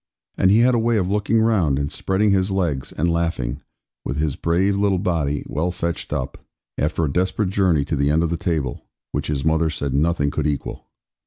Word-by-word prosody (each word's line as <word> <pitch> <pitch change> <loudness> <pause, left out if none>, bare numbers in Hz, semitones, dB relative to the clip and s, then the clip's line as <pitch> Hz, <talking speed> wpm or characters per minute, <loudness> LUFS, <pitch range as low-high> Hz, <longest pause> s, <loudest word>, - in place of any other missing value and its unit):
And 95 - +3
he 105 +4 +5
had 125 +1 +4
a 120 - +2
way 115 0 +2
of 95 -2 0
looking 105 +2 +2
round, 95 -11 +2
and 70 0 -2
spreading 100 +2 +1
his 95 0 +2
legs, 85 -9 -1
and 80 - -1
laughing, 80 -6 -1 0.4
with 70 - -3
his 75 -2 0
brave 95 +4 +1
little 100 -1 +2
body 80 -6 -1
well 75 +8 -1
fetched 85 -1 -3
up, 65 - -3 0.4
after 80 +3 0
a 70 - -3
desperate 95 +2 0
journey 90 -7 +2
to 75 - -2
the 70 0 +1
end 80 +3 +2
of 85 - -1
the - - +1
table, 80 -6 -2 0.3
which - - -2
his 70 -1 -2
mother 80 0 +2
said 70 -3 -3
nothing 75 0 +1
could 75 0 -1
equal. 75 -2 -4
85 Hz, 210 wpm, -22 LUFS, 75-95 Hz, 0.4 s, he